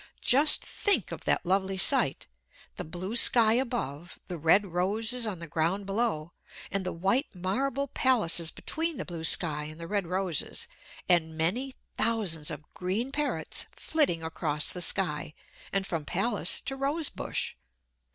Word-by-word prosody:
Just 290 +4 +5
think 410 - -1
of - - -8
that - - +1
lovely 190 +1 0
sight! 185 - +5 0.5
The - - -5
blue 185 +7 -6
sky 230 -2 +7
above, 225 - -3
the 175 - -5
red 170 +7 +4
roses 220 +6 -1
on 200 -4 -4
the 170 - -8
ground 165 +5 -2
below, 195 -6 -2 0.4
and 195 -1 -1
the 185 - -3
white 195 - 0
marble 265 +10 -2
palaces 205 - +3
between 325 - -3
the - - -5
blue 170 -2 -7
sky 150 -2 +2
and 155 +2 -10
the 170 - -7
red 200 0 -2
roses; 180 -3 -2 0.4
and 160 -3 +1
many 240 +12 -1 0.2
thousands 205 -9 +1
of - - -6
green 200 +9 -3
parrots 295 +1 -2
flitting 280 - +1
across 150 -2 0
the 180 - -5
sky, 155 -5 +1 0.4
and 195 -1 -1
from 165 -5 -4
palace 195 +10 +1
to 270 - -3
rose 285 +3 -1
bush. - - -4
190 Hz, 150 wpm, -28 LUFS, 165-240 Hz, 0.5 s, sky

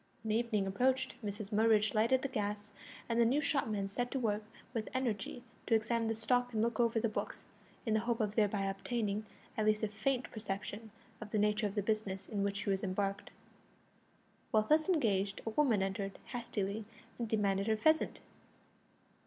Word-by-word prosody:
When 220 - -1
evening 220 -3 +1
approached 255 +7 +1
Mrs 205 0 -4
Murridge 215 0 +4
lighted 235 +4 +3
the - - +1
gas, 210 -4 -3 0.4
and 235 0 +2
the - - +7
new 250 +6 +3
shopman 220 -9 0
set 245 +5 -2
to 270 - -1
work 215 -3 0 0.3
with 225 -3 -2
energy 245 -2 -2 0.2
to 225 - +5
examine 225 +1 +1
the 225 - 0
stock 245 +3 +1
and 215 - +1
look 235 -1 0
over 230 -1 +3
the 230 - +1
books, 215 - -4 0.4
in 220 - +1
the 220 - +4
hope 235 +1 -1
of 210 -2 0
thereby 205 -2 +2
obtaining 205 +2 -2 0.3
at 215 -1 +1
least 215 0 +3
a - - +3
faint 245 +5 -1
perception 215 +1 -5 0.3
of 215 - -6
the 215 - 0
nature 210 +1 +2
of 200 - -6
the 205 - +1
business 200 -2 -1
in 205 -2 -2
which 200 0 -1
he 200 - 0
was 195 +1 0
embarked. 195 +1 -1 1.2
While 215 -1 +4
thus 310 - +3
engaged 205 - +1
a 225 - -1
woman 225 -6 +3
entered 195 0 -3
hastily 215 -3 -3 0.4
and 230 -2 -2
demanded 200 -2 +1
her 220 -1 +3
pheasant. 315 +8 +2
215 Hz, 185 wpm, -34 LUFS, 205-235 Hz, 1.2 s, the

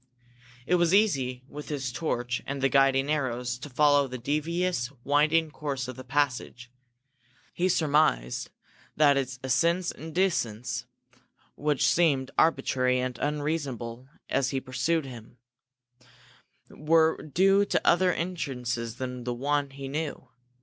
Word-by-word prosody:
It 180 +6 +3
was 175 +1 +3
easy, 130 - +1
with 150 +1 -9
his 135 -4 -3
torch 120 -5 -2
and 140 0 -3
the 135 0 +2
guiding 135 0 +3
arrows, 125 -4 -2
to 145 - -8
follow 145 +1 +3
the 130 0 -6
devious, 155 +1 -1
winding 150 +3 +2
course 140 -4 -4
of 130 - -6
the 130 - -9
passage. 125 -3 -2 0.8
He 180 +2 0
surmised 145 - +1 0.5
that 145 -1 +5
its 130 -2 -2
ascents 170 +7 +1
and 160 +1 -9
descents, 125 - -1 0.7
which 150 -2 0
seemed 140 -6 +2
arbitrary 130 -5 +2
and 125 0 -2
unreasonable 140 -5 -3 0.2
as 135 -1 0
he 135 - -1
pursued 135 +5 -1
them, 120 -2 -11 1.3
were 160 +1 +2
due 195 +6 +3
to - - -1
other 180 +1 +4
entrances 125 -10 -3
than 125 0 -5
the 120 0 -3
one 145 +2 0
he 135 0 -8
knew. 150 +2 -4
140 Hz, 130 wpm, -27 LUFS, 125-155 Hz, 1.3 s, that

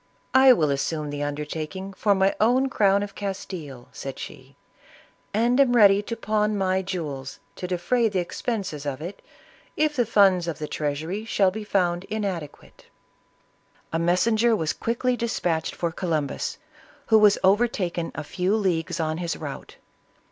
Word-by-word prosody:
" - - -39
I 265 0 +8
will 155 - +3
assume 150 +2 -2
the 145 0 -4
undertaking 155 +6 -4
for 200 +1 +2
my 190 +1 +3
own 255 +5 +3
crown 200 -4 +3
of 200 -1 -7
Castile," 180 -11 -6
said 135 -1 -7
she, - - -10 0.4
" - - -24 0.3
and 240 +5 +2
am 255 -3 +4
ready 200 -3 +6
to 230 +2 -5
pawn 215 -1 0
my 190 -1 +1
jewels 150 -8 -5 0.2
to 180 - -4
defray 225 +7 +1
the 200 - -2
expenses 185 - -3
of 135 -1 -3
it, 175 +6 -7 0.6
if 305 -1 +1
the 245 -4 +1
funds 195 -5 +4
of 165 - -3
the 150 - -5
treasury 155 +9 -3
shall 200 -4 +2
be 215 +2 -6
found 180 -3 0
inadequate 195 -9 -5 1.1
I" - - +2
A - - -1
messenger 220 +7 +3
was 160 -6 -1
quickly 245 +2 -1
dispatched 180 -9 -1
for 170 -1 -2
Columbus, 160 -4 -2 0.5
who 220 -1 +5
was 210 -1 +6
overtaken 190 -4 +1
a - - -4
few 180 +6 0
leagues 180 -5 -1
on 160 0 -1
his 170 -2 -3
route. 145 -3 -8
190 Hz, 160 wpm, -25 LUFS, 160-215 Hz, 1.1 s, I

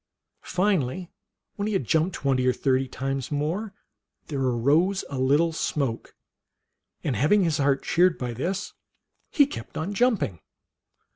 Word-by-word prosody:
Finally, 180 -3 0 0.5
when 205 0 -1
he 215 - -1
had 195 - +1
jumped 165 +2 +1
twenty 130 -2 +1
or 125 - +4
thirty 130 0 +1
times 135 +1 -4
more, 165 +9 -2 0.6
there 145 -3 -2
arose 145 +10 +2
a 135 - -3
lit 130 +2 +4
tle 165 +1 +1
smoke, 135 -7 -2 0.9
and, 135 - -1
having 190 +9 +3
his 160 -4 0
heart 140 -1 +2
cheered 180 0 +3
by 125 -2 -3
this, 185 - -3 0.6
he 290 -5 +5
kept 285 - -8
on 175 +6 -3
jumping. 205 - +1
150 Hz, 145 wpm, -25 LUFS, 135-185 Hz, 0.9 s, he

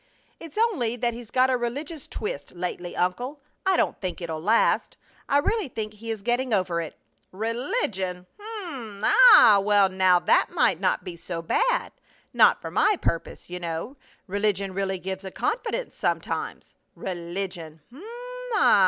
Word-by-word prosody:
"It's 330 +3 -11
only 355 - +1
that 240 0 -1
he's 235 -1 -9
got 260 +1 +3
a 255 - +2
religious 285 +6 -5
twist 145 -9 -5
lately, 175 0 -4
uncle. 245 +11 -1 0.3
I 380 -2 +4
don't - - 0
think 185 -2 -4
it'll 165 -3 -4
last. 215 +7 +2 0.3
I 280 - +4
really 405 +6 +1
think 215 -4 -5
he 225 +2 -9
is 220 -3 -4
getting 240 0 +1
over 180 -3 0
it!" 160 - -8 0.3
"Religion! 215 - -2 0.4
Um! 230 - -8
Ah! 445 - +8
Well, 205 -1 +4
now 185 -1 +4
that 175 - +3
might - - +2
not - - +1
be 180 -3 -7
so 165 0 -6
bad - - +1 0.4
not - - +5
for - - -7
my 420 -2 +3
purpose, 165 - -3
you 180 0 -6
know. 170 - -4 0.3
Religion 200 -1 -1
really 195 0 -1
gives 190 +1 -5
a 190 - -5
confidence - - -2
sometimes. - - -3 0.2
Religion! 175 -3 -5
Um! 280 - -12
205 Hz, 155 wpm, -25 LUFS, 180-255 Hz, 0.4 s, Ah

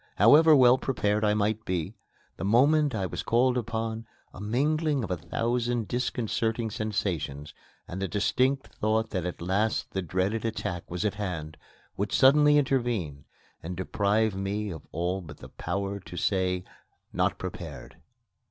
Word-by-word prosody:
However 150 - +7
well 130 -1 +6
prepared 105 -5 0
I 105 0 +3
might 105 +1 0
be, 90 -6 -2 0.4
the - - -5
moment 140 +6 +4
I 100 -3 -1
was - - -4
called 125 +2 +2
upon, 115 -1 -3 0.3
a - - -10
mingling 145 +6 +1
of 100 - -4
a - - +1
thousand 115 +6 -1
disconcerting 115 -2 -1
sensations, 95 - -3 0.3
and 95 +2 -6
the 95 - 0
distinct 130 +7 +1
thought 110 +1 0
that 90 -3 -2
at 90 - -6
last 100 +5 0
the 95 - -2
dread 95 +3 -1
attack 100 -6 -4
was 90 +2 -3
at 105 - +1
hand, 90 -7 -5 0.4
would 100 +1 -2
suddenly 150 +2 +6
intervene 120 - 0 0.4
and 90 +1 -6
deprive 105 +3 +1
me 100 +2 -3
of 80 - -9
all 90 +4 -2
but 75 -4 -11
the - - -12
power 100 +3 -3
to 90 -1 -10
say, 90 -1 0 0.5
"Not - - +1
prepared." - - -8
105 Hz, 150 wpm, -27 LUFS, 95-120 Hz, 0.5 s, However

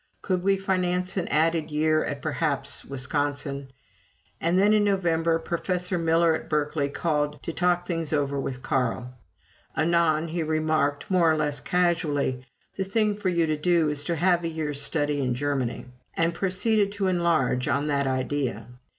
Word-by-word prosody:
Could 185 -2 0
we 195 +1 +2
finance 185 -1 -1
an 185 -3 -1
added 160 +1 +1
year 155 +1 +2
at, 145 -1 -5
perhaps, 150 -2 0
Wisconsin? 140 0 -2 0.7
And 170 +2 +2
then, 205 +2 +4
in 210 -1 +4
November, 170 -5 +1
Professor 180 +2 -2
Miller 165 0 +3
of 160 - -5
Berkeley 150 -1 0
called 150 -1 -1
to 165 - -4
talk 175 0 +1
things 165 -3 -2
over 140 -2 0
with 130 -1 -4
Carl. 125 -1 -1 0.6
Anon 165 -1 +2
he 170 +1 -2
remarked, 155 -1 0
more 170 -3 +4
or 155 - +1
less 150 -2 0
casually, 160 -7 0 0.3
"The 195 - 0
thing 210 +2 +1
for 205 -2 -1
you 170 -2 +2
to 155 -1 -1
do 165 0 +2
is 145 -1 -2
to 170 - 0
have 175 +1 +2
a - - -1
year's 155 -3 -3
study 145 -1 0
in 125 -2 0
Germany," 135 -3 -2 0.3
and 165 +1 +1
proceeded 200 +3 +1
to 200 -1 -2
enlarge 165 -8 +1
on 140 0 +1
that 140 -2 0
idea. 130 -4 -2
160 Hz, 165 wpm, -26 LUFS, 145-175 Hz, 0.7 s, then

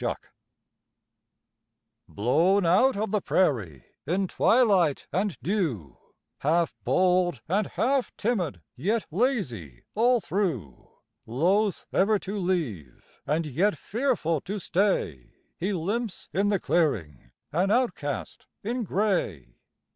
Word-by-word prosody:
COYOTE - - -3 1.8
Blown 170 - +2
out 200 +9 +4
of 215 -1 -2
the 210 -2 +1
prairie 110 - 0 0.2
in 185 +4 +1
twilight 195 - +3
and 195 -1 0
dew, 150 - -1 0.4
Half 165 +3 +1
bold 180 -7 +2
and 200 +5 +1
half 265 +2 0
timid, 180 - -1
yet 210 - 0
lazy 150 - -1
all 240 +3 +3
through; 160 - -3 0.4
Loath 185 - +1
ever 210 +3 +3
to 200 +1 -5
leave, 145 - -4
and 160 +2 0
yet 175 +9 +1
fearful 220 - -1
to 205 +2 -4
stay, 175 - -1 0.2
He 190 +4 -1
limps 205 +5 -3
in 200 +2 +2
the 200 -2 +2
clearing, 85 - 0 0.2
an 180 +6 +1
outcast 205 - -1 0.2
in 240 +4 -2
gray. 175 - -1
185 Hz, 110 wpm, -27 LUFS, 145-210 Hz, 1.8 s, out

